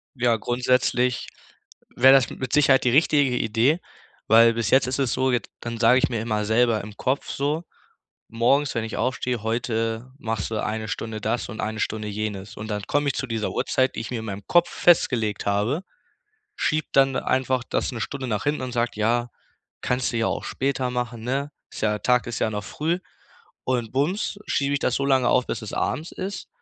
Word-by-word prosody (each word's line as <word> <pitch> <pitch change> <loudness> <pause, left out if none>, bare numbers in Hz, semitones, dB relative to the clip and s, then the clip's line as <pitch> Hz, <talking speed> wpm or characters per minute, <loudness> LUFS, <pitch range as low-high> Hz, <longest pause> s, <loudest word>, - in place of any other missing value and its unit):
Ja, 120 -2 +2
grundsätzlich 125 +1 +1 0.7
wär 130 +2 +7
das 135 -2 +5
mit 130 -2 -6
Sicherheit 140 -2 +4
die 125 - +4
richtige 140 -2 +3
Idee, 120 +9 +2 0.5
weil 115 +1 +7
bis 115 -3 -1
jetzt 130 -1 +5
ist 130 +2 -2
es 130 -4 +1
so, 130 0 +1
jetzt 125 - -1
dann 120 -1 -5
sage 115 +2 +5
ich - - +2
mir 115 -3 -2
immer 105 -2 -1
selber 110 0 +2
im 105 0 -10
Kopf 130 +5 -1
so, 150 +4 -1 0.6
morgens, 135 +5 +2
wenn 115 - -1
ich 110 - -5
aufstehe: 125 -1 -1
„Heute 115 +1 -2
machst 110 -4 -3
du 110 - -2
1 110 0 -3
Stunde 110 0 -4
das 110 +3 -2
und 110 - -6
1 110 +1 -3
Stunde 110 0 -2
jenes.“ 105 0 -5
Und 105 - -6
dann 105 -2 -3
komme 145 +6 0
ich 140 - 0
zu 130 - -3
dieser 115 -2 -2
Uhrzeit, 130 0 +1
die - - -4
ich 115 - -5
mir 120 -3 -3
in - - -7
meinem 100 -2 -6
Kopf 175 0 +4
festgelegt 115 - +2
habe, 105 - 0 0.7
schiebe 155 - 0
dann 135 -1 +4
einfach 130 -1 0
das - - -1
'ne 120 -2 -5
Stunde 130 +3 -4
nach 105 -3 -1
hinten 145 0 0
und 130 - -4
sag: 120 -2 -1
„Ja, 120 +3 +1 0.5
kannst 125 0 0
du - - 0
ja 115 - +1
auch - - -2
später 135 -1 -1
machen, 125 -2 -3
ne? 135 +4 -2 0.2
Ist - - -8
ja 105 -1 +1
Tag 125 +2 +2
ist 120 - -4
ja - - +1
noch 105 -2 -4
früh." 160 - -1 0.7
Und 120 -3 -1
bums 175 +9 -1
schiebe 140 0 0
ich 140 - +1
das 125 - 0
so 140 - 0
lange 130 -3 +3
auf, 125 - +3
bis - - -3
es 110 - -7
abends 160 +3 -2
ist. 195 +2 -6
120 Hz, 205 wpm, -24 LUFS, 110-135 Hz, 0.7 s, wär